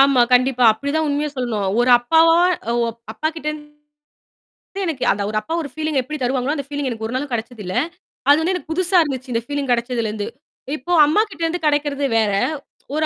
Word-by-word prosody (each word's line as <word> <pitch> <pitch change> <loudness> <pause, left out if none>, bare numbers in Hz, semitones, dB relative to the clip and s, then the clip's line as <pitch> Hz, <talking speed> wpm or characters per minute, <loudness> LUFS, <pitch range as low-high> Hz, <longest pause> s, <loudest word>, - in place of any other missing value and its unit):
ஆமா. 275 -2 +5
கண்டிப்பா 250 0 +3
அப்பிடித்தான். 285 +7 -2
உண்மைய 290 +1 0
சொல்லணும். 230 -6 -2
ஒரு 245 +1 +3
அப்பாவா 325 +6 +4 0.4
ஓ - - +1 0.4
அப்பாக்கிட்டந்து 300 +1 -5 1.0
எனக்கு 310 -6 -2
அந்த 205 - -3
ஒரு 215 - -4
அப்பா 215 +10 -5
ஒரு 290 - -6
ஃபீலீங்க 310 -3 0
எப்பிடி 305 +4 -6
தருவாங்க? 255 +3 0
அந்த 280 - -4
ஃபீலீங் 285 -2 -3
எனக்கு 225 -2 -4
ஒரு 240 - -5
நாளும் 285 +2 -3
கிடைச்சது 230 -1 -4
இல்ல. 185 - -5 0.6
அது 290 +2 +6
எனக்குப் 360 -3 -2
புதுசா 360 +2 +3
இருந்துச்சு. 260 -3 -5
இந்த 230 - 0
ஃபீலீங் 285 -1 -2
கிடைச்சதுல 235 -1 0
இருந்து. 210 -1 -4 0.5
இப்போ 350 +7 -3
அம்மாக்கிட்ட 390 +3 0
இருந்து 330 0 -2
கிடைக்குறது 290 -1 0
வேற. 215 -2 +2 0.6
ஒரு, 310 +1 +1
285 Hz, 175 wpm, -20 LUFS, 245-310 Hz, 1.0 s, அது